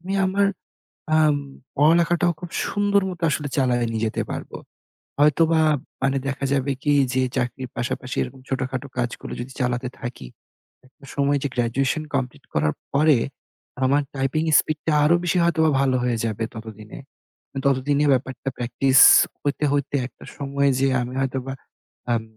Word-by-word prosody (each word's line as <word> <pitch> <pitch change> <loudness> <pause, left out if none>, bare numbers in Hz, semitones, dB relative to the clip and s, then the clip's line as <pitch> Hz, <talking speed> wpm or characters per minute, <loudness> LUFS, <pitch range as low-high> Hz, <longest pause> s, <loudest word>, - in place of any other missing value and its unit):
আমি 185 +3 -5
আমার 200 +2 +2 0.7
আম 155 -2 +4 0.4
পড়ালেখাটাও 170 +3 +3
খুব 175 - -7 0.2
সুন্দর 205 0 +1
মত 180 -3 -7
আসলে 145 0 -2
চালায়া 125 -3 +2
নিয়ে 115 0 -1
যেতে 110 - -2
পারব। - - -5 0.7
হয়তোবা 160 +2 +4 0.4
মানে 135 0 +1
দেখা 140 0 -3
যাবে 140 0 0
কি 145 - +2 0.2
যে 130 - +1
চাকরির 125 +1 -2
পাশাপাশি 120 +1 -3
এরকম 135 - -7
ছোটখাটো 130 +1 -3
কাজগুলো 120 -1 -3
যদি 125 +2 -7
চালাতে 125 0 -1
থাকি। 120 - -6 0.6
একটা 135 +1 -22
সময় 140 0 +2
যে 145 - 0
গ্র্যাজুয়েশন 125 +5 0
কমপ্লিট 130 +2 -3
করার 75 0 +1 0.2
পরে, 150 -1 +4 0.7
আমার 140 +3 +3
টাইপিং 135 +3 0 0.2
স্পিডটা 155 +1 -3
আরো 155 +3 +5
বেশি 175 +1 +1
হয়তোবা 160 -2 +3
ভালো 135 -2 +2
হয়ে 120 -2 0
যাবে 110 0 -2
ততদিনে। 110 -1 -9 0.7
ততদিনে 140 +2 +2
ব্যাপারটা 130 +1 -2
প্র্যাকটিস 130 +2 +2 0.4
হইতে, 145 +1 -1
হইতে 145 0 -1
একটা - - -14
সময় 140 0 0
যেয়ে 135 0 +2
আমি 125 +1 -6
হয়তোবা, 135 0 -2 0.6
আম 115 - +1
135 Hz, 145 wpm, -23 LUFS, 125-150 Hz, 0.7 s, আরো